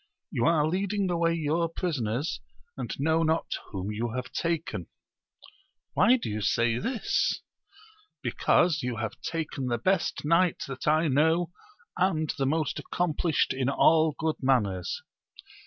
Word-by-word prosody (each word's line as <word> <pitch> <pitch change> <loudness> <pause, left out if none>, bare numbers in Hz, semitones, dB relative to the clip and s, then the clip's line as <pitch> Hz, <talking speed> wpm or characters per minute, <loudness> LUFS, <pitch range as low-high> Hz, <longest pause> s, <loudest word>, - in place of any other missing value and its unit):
You 120 - 0
are 160 -3 +4
leading 195 +2 0
away 170 -1 +2
your 165 +1 0
prisoners, 145 - -2 0.3
and - - -5
know 160 +3 +2
not 160 0 0 0.2
whom 95 +1 -4
you 115 +3 -2
have 125 0 -4
taken. 165 - -2 0.6
— - - -30
^Why 230 - +5
do - - -5
you 105 0 -3
say 115 +3 +2
this? 235 - 0 0.4
— 430 0 -26
Because 160 -3 +2
you 125 -2 -2
have 110 0 -5
taken 150 -5 -3
the 120 -1 0
best 185 +4 0
knight 170 +2 +3
that 135 +1 -6
I 155 +2 +4
know, 160 +5 +2 0.5
and 160 -4 +1
the 135 - +2
most 155 +1 0
accom 175 -4 -1
plished 160 -5 +1
in 130 0 0
all 155 +2 +4
good 160 -1 -1
manners. 105 -9 0
155 Hz, 150 wpm, -28 LUFS, 130-170 Hz, 0.6 s, ^Why